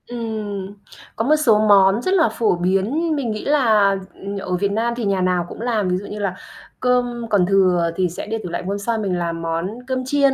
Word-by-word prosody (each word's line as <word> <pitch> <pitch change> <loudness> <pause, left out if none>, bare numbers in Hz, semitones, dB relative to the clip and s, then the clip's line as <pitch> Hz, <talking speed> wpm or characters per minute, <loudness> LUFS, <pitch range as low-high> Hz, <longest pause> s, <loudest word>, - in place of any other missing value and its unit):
Ừm, 215 -5 -5 0.4
có 225 - -1
một 300 +4 +4
số 240 -9 +3
món 195 +2 +5
rất 370 - 0
là 345 -5 +4
phổ 220 -6 +1
biến, 200 - 0
mình 260 -6 -2
nghĩ 215 - -5
là, 220 -9 +3 0.2
ừm, 200 +1 -6
ở 185 -2 -3
Việt 200 +2 0
Nam 230 +3 0
thì 235 - -2
nhà 195 -2 +1
nào 180 -1 +1
cũng - - -9
làm, 225 -5 0
ví 180 - +1
dụ 200 - -7
như 210 - -7
là 195 -3 -2 0.4
cơm 245 -2 0
còn 200 -4 +3
thừa 180 -3 +3
thì 185 0 +1
sẽ 170 - -7
để 225 +1 -2
tủ 180 - -5
lạnh 175 +1 -4
hôm 200 +1 -1
sau 225 +3 -2
mình 195 -4 -1
làm 170 -1 -3
món 165 +2 -2 0.2
cơm 255 -1 -2
chiên. 275 0 +3
205 Hz, 230 wpm, -20 LUFS, 185-240 Hz, 0.4 s, món